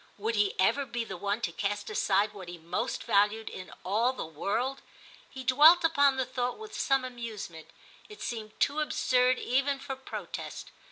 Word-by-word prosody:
Would 220 +3 -1
he 205 -2 +1
ever 225 +9 +3
be 235 0 -2
the 195 -4 -7
one 200 +5 -2
to 170 - -1
cast 205 +3 -2
aside 205 +2 +2
what 190 -3 -9
he 175 0 -7
most 170 +2 -3
valued 210 +2 +2
in 185 - -8
all 225 +7 +2
the 255 - -5
world? 230 - -2 0.5
He 260 -1 -8
dwelt 300 +7 +7
upon 285 -4 +4
the 260 - +1
thought 250 -1 -2
with 435 -1 -10
some 270 -2 +1
amuse 235 -7 -6
ment; 160 -1 -12 0.4
it 420 - -12
seemed 220 -2 -5
too 285 +2 +2
absurd 255 -4 +2
even 275 +2 +1
for 270 0 -6
protest. 265 0 -7
235 Hz, 180 wpm, -29 LUFS, 205-265 Hz, 0.5 s, dwelt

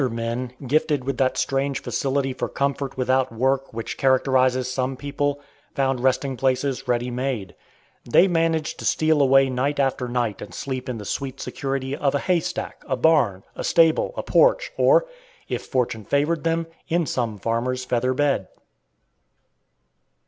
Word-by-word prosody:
Other 130 - +2
men, 115 +2 -3
gifted 145 0 +1
with 135 -1 -3
that 130 -1 +2
strange 135 0 0
facility 135 -1 -1
for - - -3
comfort 140 -1 -2
without 130 0 +1
work 135 +4 0
which 115 0 -6
characterizes 130 -1 +3
some 130 +1 -2
people, 145 +1 -2 0.4
found 135 -3 +1
resting 130 +1 0
places 135 0 0
ready 120 0 0
made. 120 -7 -3 0.6
They 175 +10 +6
managed 165 -3 0
to - - -6
steal 155 -1 +2
away 135 0 +5
night 130 +3 -1
after 135 -2 0
night 120 -4 -2
and - - -9
sleep 130 -2 -4
in 125 - -3
the 105 - -8
sweet 135 +2 -4
security 135 0 -3
of 145 -1 0
a - - +4
haystack, 180 +1 -2
a 130 -3 -1
barn, 125 -10 +3
a - - -5
stable, 165 - +3
a - - -2
porch, - - +3
or, - - +4 0.4
if - - -4
fortune 125 -5 -1
favored 145 +6 0
them, 165 0 +1 0.2
in 170 -1 +1
some 120 -6 -2
farmer's 120 +5 -2
feather 125 +1 0
bed. 140 -9 +1
135 Hz, 155 wpm, -23 LUFS, 125-145 Hz, 0.6 s, They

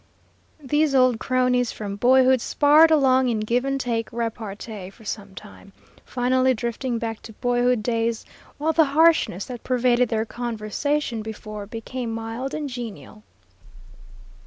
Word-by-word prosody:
These 295 +1 +1
old 255 -3 +4
cronies 250 -1 +1
from 200 -2 -6
boyhood 255 +3 +4
sparred 300 +5 +5
along 265 -4 +4
in 225 -2 0
give 235 +4 0
and 275 0 -1
take 230 -3 -2
repartee 220 -4 -5
for 220 +3 -18
some 200 -2 -6
time, 200 -1 -13 0.3
finally 255 +1 +1
drifting 235 +2 -3
back 225 -1 -4
to 220 - -11
boyhood 245 0 +1
days, 230 -1 -1 0.3
while 315 +2 0
the 320 0 +5
harshness 320 - +3
that 245 -2 -8
pervaded 250 -1 +2
their 220 -1 0
conversation 235 +3 -3
before 215 -1 -7
became 235 +2 -5
mild 225 +4 -4
and 305 -1 -3
genial. 230 - -8
240 Hz, 135 wpm, -23 LUFS, 220-260 Hz, 0.3 s, sparred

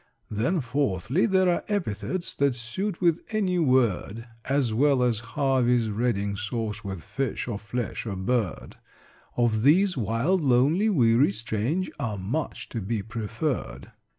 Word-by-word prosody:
"Then 125 - 0
fourthly, 130 - 0
there 190 -2 +3
are 175 - +1
epithets 185 - -2
That 140 -3 +1
suit 170 - -4
with 170 -2 +3
any 190 -5 0
word 120 - +1 0.2
As 135 -4 +1
well 135 +2 +3
as 120 -3 +1
Harvey's 125 -2 +1
Reading 105 -3 0
Sauce 105 +1 -3
With 95 -4 -6
fish, 120 +7 -3
or 105 -4 -3
flesh, 115 +1 -4
or 100 - -3
bird 100 0 -2 0.6
Of 115 -3 +2
these, 180 - +4
'wild,' 125 - +1
'lonely,' 145 - +3
'weary,' 120 - +4
'strange,' 115 - -1
Are 110 -7 -2
much 115 +12 -3
to 115 - -4
be 105 +1 -2
preferred." 110 - -4
120 Hz, 140 wpm, -26 LUFS, 110-150 Hz, 0.6 s, these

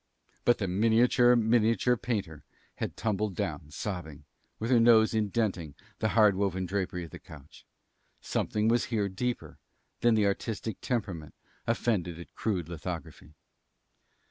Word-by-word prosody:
But 120 - +5
the 100 - -2
miniature 115 +5 +4
miniature 115 +1 +3
painter 100 -11 -4 0.3
had - - -4
tumbled 105 -3 -1
down, 75 - -3
sobbing, 80 -5 -6 0.3
with 115 +3 -3
her 120 - +6
nose 115 -1 +5
indenting 100 -8 -1 0.2
the 110 - +1
hard 105 -2 +6
woven 95 -1 -1
drapery 90 -1 -2
of 85 - -10
the - - -9
couch. 75 -2 -15 0.5
Something 105 0 -1
was 120 +1 +3
here 110 -5 0
deeper 120 +6 -4 0.4
than 120 -1 +4
the 105 -2 +3
artistic 105 +1 -2
temperament 95 - -3 0.3
offended 100 -8 0
at 85 - -11
crude 95 -7 -2
lithography. 80 -3 -7
105 Hz, 135 wpm, -29 LUFS, 90-115 Hz, 0.5 s, her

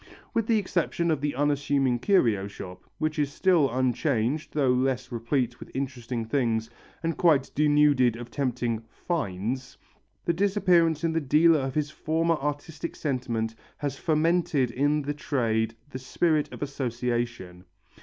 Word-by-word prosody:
With 230 -2 0
the 230 - +3
exception 170 -3 0
of 150 -3 0
the 145 -2 -1
unassuming 140 -3 +1
curio 115 - +2
shop, 90 -2 -10
which 155 0 -1
is 145 -1 +1
still 170 -3 +3
unchanged 130 +2 0
though 135 -4 +3
less 130 0 0
replete 120 +1 -1
with - - -10
interesting 125 -3 -3
things 115 -2 0 0.3
and 165 0 0
quite 150 -6 +3
denuded 145 -5 +4
of 120 0 -9
tempting 120 -4 -1
"finds," 125 - -3 0.5
the 170 - +2
disappearance 175 -4 +2
in 165 -1 +1
the 165 - +1
dealer 155 +3 +4
of 135 -1 -3
his 150 -1 0
former 165 +2 0
artistic 150 +3 -4
sentiment 120 -6 -2 0.2
has 145 -2 -3
fomented 155 -5 +1
in 145 +4 +1
the 145 +1 -2
trade 115 -6 -1 0.2
the 130 - -5
spirit 155 +3 0
of - - -6
association. 120 -8 -3
140 Hz, 145 wpm, -27 LUFS, 120-155 Hz, 0.5 s, denuded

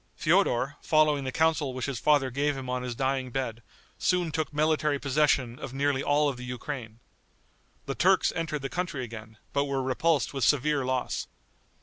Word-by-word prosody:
Feodor, 135 +4 +2
following 155 -3 +3
the 130 - -2
counsel 155 -3 +1
which 130 - -2
his 135 -5 -3
father 145 -2 +3
gave 140 +2 0
him 130 -1 -5
on 125 0 -1
his 125 -1 -4
dying 130 0 -1
bed, 120 -3 -3 0.4
soon 180 -3 +1
took 155 -1 -2
military 150 -1 +1
possession 140 -3 +1
of 130 - -7
nearly 140 -1 +1
all 145 +1 +2
of 135 -3 -2
the 125 - -8
Ukraine. 125 -2 -6 0.9
The - - -2
Turks - - +3
entered 150 -3 -3
the - - -1
country 170 -3 -3
again, 110 -2 -9 0.2
but 140 0 +2
were 135 -1 -1
repulsed 145 +4 +1
with 135 -2 -2
severe 145 +2 +2
loss. 130 -1 -2
140 Hz, 180 wpm, -28 LUFS, 125-150 Hz, 0.9 s, following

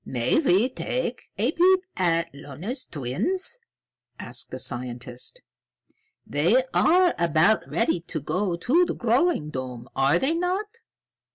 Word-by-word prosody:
"May 120 - 0
we 235 - +3
take 250 -1 -4
a 230 +7 +1
peep 370 +3 +4
at 170 -4 0
Lona's 150 - -6
twins?" 260 - -1 0.6
asked - - -3
the - - -6
scientist. 125 - -3 0.8
"They 180 - +2
are 360 +1 +4
about 170 +5 +3
ready 230 -6 +1
to 165 -1 -5
go 180 +5 -1
to 265 - +2
the - - -3
growing 240 - +1
dome, 125 -3 -6
are 135 +1 +3
they 275 +4 +1
not?" 360 +4 -1
190 Hz, 125 wpm, -25 LUFS, -, 0.8 s, peep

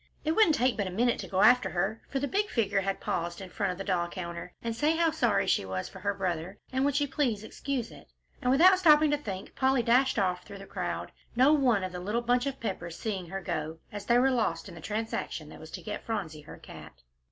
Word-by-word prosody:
It 310 - +2
wouldn't 330 -3 +5
take 255 -3 +1
but 200 -3 -1
a - - -4
minute 235 +6 +1
to - - -5
go 190 -1 0
after 250 +2 +6
her, 195 +5 -1
for 275 - -2
the 280 +1 -1
big 410 +6 0
figure 200 -4 +1
had 195 0 -2
paused 170 0 -3
in 190 -2 -9
front 200 -3 -1
of 180 - -6
the 195 - -4
doll 180 -3 0
counter, 170 0 -6
and 230 -1 -2
say 300 +7 +2
how 330 -1 +3
sorry 240 -7 +2
she - - +2
was, 95 -1 -4
for 190 - -11
he 200 - -8
was - - +4
her - - -5
brother, 185 0 -3 0.2
and 260 +1 +1
would 285 -1 +1
she 290 0 +2
please 260 -7 0
to - - -9
excuse 260 -1 -4
it? - - -14 0.3
And 250 - 0
without 365 +8 +6
stopping 305 -4 +6
to 295 - +2
think, 195 -9 -6
Polly 265 -2 +2
dashed 250 +3 +3
off 180 -3 0
through 200 - -10
the 195 - -10
crowd, - - -4 0.2
no 260 +5 +6
one 250 -9 +3
of 185 - -3
the 180 - -6
little 210 +6 -2
bunch 245 +2 +2
of 275 -1 -4
Peppers 175 -6 -4
seeing 195 -5 -3
her 195 +3 -5
go, 155 -2 -3
as 205 -1 -7
they 240 - +5
were 265 +2 +4
lost 195 -10 0
in - - -10
the 165 - -10
transaction 210 -6 -4
that - - -11
was 160 0 -11
to - - -8
get 210 -1 -5
Phronsie 180 -9 -4
her - - -11
cat. - - -12
215 Hz, 265 wpm, -29 LUFS, 185-265 Hz, 0.3 s, after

